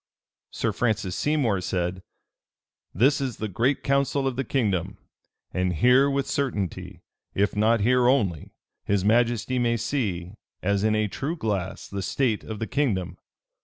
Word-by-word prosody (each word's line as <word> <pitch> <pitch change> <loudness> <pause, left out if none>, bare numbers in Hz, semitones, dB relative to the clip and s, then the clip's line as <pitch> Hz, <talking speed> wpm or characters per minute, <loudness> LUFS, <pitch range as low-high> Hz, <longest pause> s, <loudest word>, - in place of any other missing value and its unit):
Sir - - -1
Francis 110 -6 -1
Seymour 135 -11 +1
said, 90 0 -2 0.9
"This 135 - +3
is 130 -4 -3
the 110 - -3
great 120 +8 0
council 140 0 +1
of 135 -2 -1
the 135 - -1
kingdom; 105 -11 -1 0.6
and 90 0 0
here 125 - +5
with 140 -1 0
certainty, 130 - -3 0.3
if 100 +1 +1
not 110 +1 +3
here 125 +3 +3
only, 100 - +1 0.3
his 100 -1 0
majesty 120 +3 +2
may 120 -1 +1
see, 105 -8 -2 0.3
as 100 +1 +1
in 110 0 +2
a 110 0 +1
true 145 - -3
glass, 100 - -3
the 100 0 -4
state 115 +1 0
of 110 - -6
the 110 - -3
kingdom. 110 -10 -1
110 Hz, 150 wpm, -25 LUFS, 100-130 Hz, 0.9 s, here